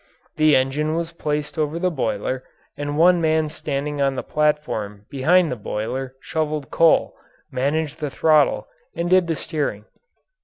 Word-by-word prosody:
The 155 -1 +5
engine 145 +4 +1
was 170 0 -2
placed 150 -2 -3
over 155 +1 0
the 180 +1 0
boiler 155 - -2 0.3
and 145 0 -3
one 175 +1 +5
man 160 -1 +2
standing 145 -1 -3
on 135 -1 +2
the - - -3
platform 150 -10 -1
behind 165 +5 +3
the - - -1
boiler 125 +5 -4
shoveled 155 -1 -3
coal, 165 -1 +4 0.4
managed 145 +4 -1
the 150 - -2
throttle, 155 +1 +3 0.3
and 170 +1 -2
did 185 -2 +5
the 165 - 0
steering. 145 - -3
150 Hz, 150 wpm, -22 LUFS, 135-160 Hz, 0.4 s, The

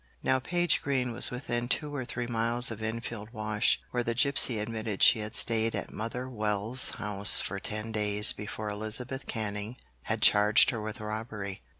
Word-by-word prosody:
Now 130 - +1
Page 175 +4 0
Green 130 -3 -2
was 115 - +3
within 120 -1 -4
two 150 +1 -2
or 130 -3 -4
three 120 0 -5
miles 120 +1 +2
of 110 -1 -7
Enfield 110 -1 -6
Wash, 110 -1 0
where 125 - -1
the 115 -1 -3
gipsy 130 -2 +2
admitted 110 -1 -4
she 115 - +6
had 110 +1 -6
stayed 115 -1 +3
at - - -6
Mother 120 +4 -5
Wells' 110 +1 +3
house 105 -1 +4
for 100 +1 -3
ten 110 +2 -4
days 105 -1 +3
before 105 0 -6
Elizabeth 120 +6 -4
Canning 105 +1 -5 0.3
had - - -2
charged 105 +1 +5
her 115 -3 -5
with 110 +3 -7
robbery. 105 -2 -6
110 Hz, 175 wpm, -28 LUFS, 105-120 Hz, 0.3 s, she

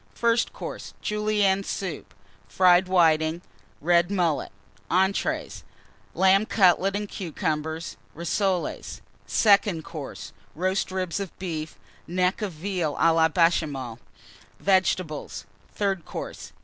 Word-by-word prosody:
FIRST 230 0 +2
COURSE. - - -8
Julienne 210 -2 +1
Soup. 190 -3 -5 0.4
Fried 180 - +4
Whitings. 165 -2 +3 0.4
Red 175 +2 +3
Mullet. 175 -6 0 0.4
ENTREES. 190 +2 0 0.5
Lamb 195 +3 +4
Cutlets 195 0 +3
and 210 0 -4
Cucumbers. 160 -3 -3 0.2
Rissoles. 180 +2 -2 0.3
SECOND 200 -5 +3
COURSE. 135 - -8 0.2
Roast 185 +4 0
Ribs 185 -1 -2
of 195 -3 -6
Beef. 160 - -5 0.3
Neck 180 +4 0
of 210 -3 -2
Veal 165 -2 -2
à 165 - +4
la 160 0 +4
Béchamel. 150 -8 +1 0.6
Vegetables. 185 -5 0 0.3
THIRD 195 -4 -1
COURSE. - - -7
180 Hz, 105 wpm, -25 LUFS, 160-195 Hz, 0.6 s, Fried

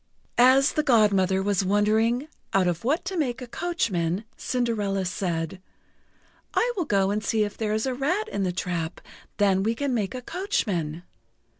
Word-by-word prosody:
As 260 +3 +6
the 305 - +2
Godmother 200 -8 +3
was 200 -1 +1
wondering 220 +7 +2 0.3
out 190 -1 +4
of 170 -1 -1
what 295 +9 0
to 380 +1 -3
make 265 -7 -1
a 255 - -6
coachman, 215 - -1
Cinderella 210 -6 -1
said: 175 -1 -3 0.9
"I 485 +1 +2
will 360 -5 -1
go 195 -4 +2
and 210 +1 -1
see 220 -2 +1
if 205 -1 -4
there 215 -1 -1
is 220 - -1
a 260 - -1
rat 345 - 0
in 200 - -3
the 185 -2 +1
trap 175 -2 -3 0.4
then 195 -2 +3
we 225 +3 0
can 280 +1 -1
make 215 0 -1
a 250 - -6
coachman." 180 - -2
215 Hz, 170 wpm, -25 LUFS, 190-255 Hz, 0.9 s, As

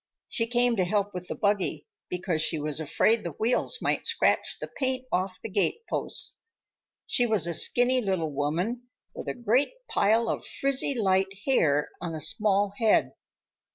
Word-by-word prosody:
She 230 -2 -1
came 240 0 +2
to 185 - +3
help 205 +2 0
with 180 0 -6
the - - -4
buggy, 200 -7 0 0.2
because 180 -3 -1
she 160 - +2
was 150 0 -2
afraid 215 +9 +2
the 170 -3 -5
wheels 235 - 0
might - - 0
scratch 460 0 +1
the - - -5
paint 260 -1 -2
off 185 +1 -1
the - - -3
gateposts. 215 - -2 0.7
She 245 -2 +2
was 215 -7 +3
a 170 - -1
skinny 250 +8 +3
little 185 -7 -1
woman 175 - -2 0.3
with - - -8
a - - -2
great 245 - +1
pile 225 +3 +2
of - - -2
frizzy 275 0 0
light 190 -3 +2
hair 150 - +2
on 165 -2 -4
a - - -5
small 205 0 +1
head. 225 -2 +3
205 Hz, 165 wpm, -27 LUFS, 175-240 Hz, 0.7 s, to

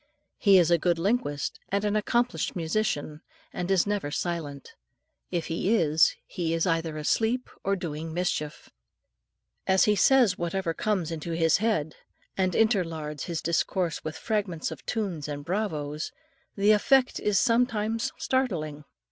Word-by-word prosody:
He 200 -2 +6
is 175 -2 +4
a 170 - +5
good 175 +1 +1
linguist 165 - -1
and 200 +2 0
an 205 0 +1
accomplished 240 +3 0
musician, 160 -3 -2 0.3
and 180 +1 -3
is 190 -3 +3
never 205 -7 -1
silent 150 -3 -4 0.6
if 170 -2 -2
he 185 +7 0
is, 160 -5 +3
he 165 -3 -2
is 165 - +1
either 165 -2 -1
asleep 225 +11 0
or 195 +1 +1
doing 160 -3 -5
mischief. 160 -3 -3 1.0
As 190 0 +4
he 210 - +3
says 235 -2 +4
whatever 170 0 -1
comes 185 -2 -1
into 165 +1 -4
his 165 -1 +3
head, 190 -8 -1 0.4
and 185 -1 +1
interlards 165 - 0
his 170 -3 -4
discourse 170 +1 0
with 155 0 -5
fragments 205 -9 -2
of 150 -5 -9
tunes 190 -10 -2
and 145 -1 -6
Bravos! 155 -6 -2 0.4
the 205 +1 +4
effect 255 +5 +3
is 210 +4 +2
at 240 +1 +4
times 225 +1 -2
startling. 185 - -1
175 Hz, 150 wpm, -27 LUFS, 160-210 Hz, 1.0 s, He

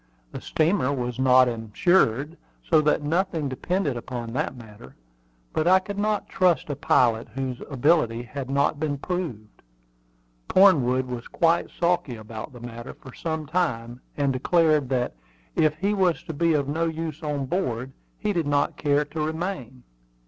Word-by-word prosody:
The - - -7
steamer 155 -3 +1
was 125 -2 -3
not 130 -1 +6
insured, 120 - +1 0.3
so 160 -3 +4
that 150 0 +1
nothing 165 0 0
depended 145 +2 -1
upon 120 -1 -6
that 150 +2 -2
matter; 105 - -13 0.6
but 155 - 0
I 185 +1 +7
could 200 +2 -5
not 210 -1 0
trust 180 -4 +1
a - - -2
pilot 115 -3 +2
whose 130 -2 -3
ability 135 -4 +2
had 135 +1 -6
not 140 +1 +1
been 150 -2 -1
proved. 140 - -5 0.9
Cornwood 130 -10 +4
was 125 -2 -6
quite 170 0 +2
sulky 170 -7 0
about 110 0 -8
the 125 - -12
matter 120 -1 -8
for 130 -4 -13
some 160 -2 -3
time, 125 -7 -2 0.2
and 140 -2 +1
declared 155 0 +2
that, 125 - 0 0.4
if 155 -1 +2
he 200 +5 0
was 185 -4 +1
to 160 - -6
be 165 +2 +2
of 140 -2 0
no 160 +4 0
use 160 -1 -4
on 145 -3 -2
board 130 -5 -2 0.3
he 210 -1 -1
did 170 -5 -1
not 145 0 +1
care 145 0 +2
to 155 +2 -5
remain. 155 - -4
145 Hz, 160 wpm, -25 LUFS, 125-165 Hz, 0.9 s, I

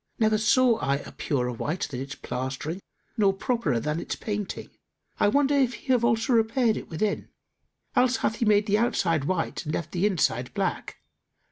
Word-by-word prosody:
Never 220 -2 +3
saw 240 +2 +4
I 140 - +1
a 140 - -7
purer 125 -4 -1
white 150 +9 -3
than 125 - -4
its 140 +2 -6
plastering 130 +7 -4 0.4
nor 200 -3 +4
properer 195 - 0
than 150 +6 -2
its - - -4
painting! 205 -3 -4 0.5
I - - +4
wonder 280 +6 +3
if 260 -4 +2
he 260 +5 -1
have 240 -2 +2
also 225 +2 +2
repaired 230 0 +3
it - - -7
within: 200 +6 -2 0.7
else 250 -1 +3
hath 220 -1 -1
he 235 - 0
made 210 -1 +4
the 210 0 +2
outside 165 - +1
white 175 0 -1
and 155 -1 -3
left 170 - -4
the 185 +3 +2
inside 125 - 0
black. - - -3
205 Hz, 180 wpm, -26 LUFS, 150-230 Hz, 0.7 s, saw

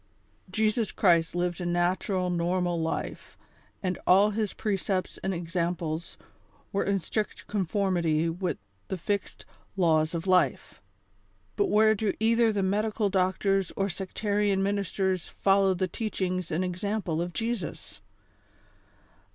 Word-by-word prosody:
Jesus 215 +2 +1
Cluist 170 -4 +3
lived 175 0 -1
a - - -3
natural, 180 +1 0
normal 175 0 0
life, 160 - -4 0.5
and 185 -1 -1
all 200 +3 +6
his 215 -1 -1
pre 210 -3 -1
cepts 190 -1 -2
and 190 - 0
examples 170 -2 -3 0.6
weie 200 - 0
in 200 0 +2
strict 210 +4 -3
conformity 175 -5 +1
with 175 +2 -2 0.3
the 190 - -3
fixed 200 +3 -3 0.3
I - - 0
aws 160 -1 +3
of 165 +2 -3
Life; 180 -8 +1 0.7
but - - +2
where 215 +1 +5
do 215 -1 0
either 230 +1 +4
the 200 -2 0
medical 210 +2 +1
doctors 190 0 +1
or 195 0 0
sectarian 200 +2 0
ministers 190 -2 -1
follow 195 -1 +3
the 185 +1 0
teachings 185 -3 -2
and 170 +4 0
example 180 -2 -2
of 175 +1 -3
Jesus? 225 -3 -4
190 Hz, 130 wpm, -28 LUFS, 175-205 Hz, 0.7 s, all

